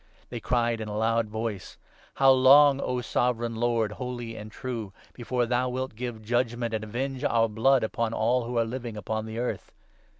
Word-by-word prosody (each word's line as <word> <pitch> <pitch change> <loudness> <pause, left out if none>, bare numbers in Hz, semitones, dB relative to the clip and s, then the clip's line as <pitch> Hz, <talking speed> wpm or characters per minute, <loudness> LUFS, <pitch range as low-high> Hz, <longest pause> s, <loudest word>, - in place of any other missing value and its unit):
They 120 - -5
10 - - -23
cried 120 -2 +1
in 110 - -5
a 105 0 -4
loud 115 0 +1
voice 110 -3 -5
— - - -30
' - - -29
How 135 -1 +6
long, 135 +2 +6
O 125 -1 -1
Sovereign 120 0 0
Lord, 115 -2 +1
holy 120 -1 -6
and 110 0 -9
true, 115 -5 -5 0.2
before 120 0 -1
thou 125 +1 0
wilt 130 0 -3
give 120 -2 -6
judgement 120 0 -1
and 110 -1 -2
avenge 130 +4 -4
our 115 -1 +3
blood 115 +5 +3
upon 110 +1 -1
all 120 +2 +1
who 120 0 -3
are 115 - +3
living 120 -2 -6
upon 110 +2 -3
the 110 0 -6
earth 120 +1 -3
120 Hz, 200 wpm, -27 LUFS, 110-125 Hz, 0.2 s, How